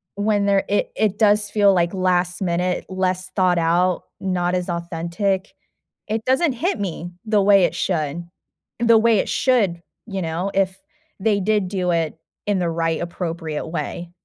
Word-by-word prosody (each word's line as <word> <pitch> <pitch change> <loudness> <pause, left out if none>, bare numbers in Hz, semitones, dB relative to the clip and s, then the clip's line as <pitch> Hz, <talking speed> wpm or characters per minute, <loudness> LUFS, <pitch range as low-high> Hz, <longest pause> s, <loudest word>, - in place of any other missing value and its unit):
when 205 0 +1
there 200 -1 +2
it 205 - 0
it 210 -2 +1
does 210 -1 +3
feel 205 -2 +4
like 175 0 +1
last 180 -1 0
minute, 180 0 -1
less 185 -1 -1
thought 180 -2 +3
out, 175 +2 +2 0.2
not 180 -2 0
as 180 0 -2
authentic. 170 +3 -2 0.6
It 220 +1 -2
doesn't 265 +3 +3
hit 330 - -1
me 175 -2 -4
the 215 -2 +2
way 195 -1 +6
it - - 0
should. 165 -1 -2 0.6
The 230 -1 +5
way 225 -1 +4
it - - 0
should, 205 -10 +1 0.3
you 195 -3 -4
know, 170 +4 -2
if 190 -1 +1 0.4
they 205 0 +2
did 210 0 +1
do 180 -2 -1
it 165 -1 -1 0.3
in 205 -2 +1
the 175 -1 0
right, 165 -1 -1
appropriate 165 -3 -4
way. 170 +1 -4
185 Hz, 165 wpm, -21 LUFS, 175-205 Hz, 0.6 s, way